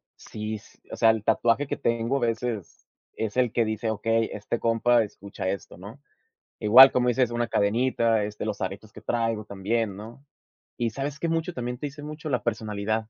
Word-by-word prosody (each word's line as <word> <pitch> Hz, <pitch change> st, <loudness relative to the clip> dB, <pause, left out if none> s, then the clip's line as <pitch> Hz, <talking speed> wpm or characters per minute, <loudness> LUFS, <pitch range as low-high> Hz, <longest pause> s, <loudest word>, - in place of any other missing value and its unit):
sí, 110 Hz, 0 st, -6 dB
s -, -, -19 dB
o -, -, -4 dB
sea, 115 Hz, -, +4 dB
el 110 Hz, -2 st, +1 dB
tatuaje 115 Hz, +5 st, +2 dB
que -, -, -4 dB
tengo, 115 Hz, +3 st, 0 dB
a -, -, -1 dB
veces 115 Hz, -5 st, -3 dB, 0.3 s
es 110 Hz, -2 st, -4 dB
el 125 Hz, -3 st, +2 dB
que 115 Hz, -, +1 dB
dice: 110 Hz, +1 st, -2 dB
"Okey, 115 Hz, +1 st, 0 dB
este 105 Hz, +3 st, -3 dB
compa 115 Hz, +1 st, +3 dB
escucha 100 Hz, -2 st, -6 dB
esto, 95 Hz, 0 st, -5 dB
¿no?". 100 Hz, +9 st, -11 dB, 0.6 s
Igual, 125 Hz, +6 st, +9 dB
como 125 Hz, -1 st, +2 dB
dices, 125 Hz, -1 st, +2 dB
una 120 Hz, -1 st, -1 dB
cadenita, 115 Hz, +1 st, +2 dB
este, 105 Hz, 0 st, -4 dB
los 105 Hz, -2 st, -3 dB
aretes 100 Hz, +3 st, -5 dB
que -, -, -12 dB
traigo 115 Hz, -2 st, -1 dB
también, 100 Hz, +1 st, -2 dB
¿no? 115 Hz, +6 st, -11 dB, 0.5 s
¿Y 115 Hz, -1 st, -1 dB
sabes 140 Hz, +5 st, -4 dB
qué? 170 Hz, -, -2 dB
Mucho 165 Hz, +2 st, -1 dB
también 125 Hz, -3 st, -4 dB
te -, -, -4 dB
dice 145 Hz, +1 st, -9 dB
mucho 150 Hz, +1 st, -7 dB
la 125 Hz, -, -1 dB
personalidad. 110 Hz, -2 st, -1 dB
115 Hz, 190 wpm, -26 LUFS, 105-125 Hz, 0.6 s, Igual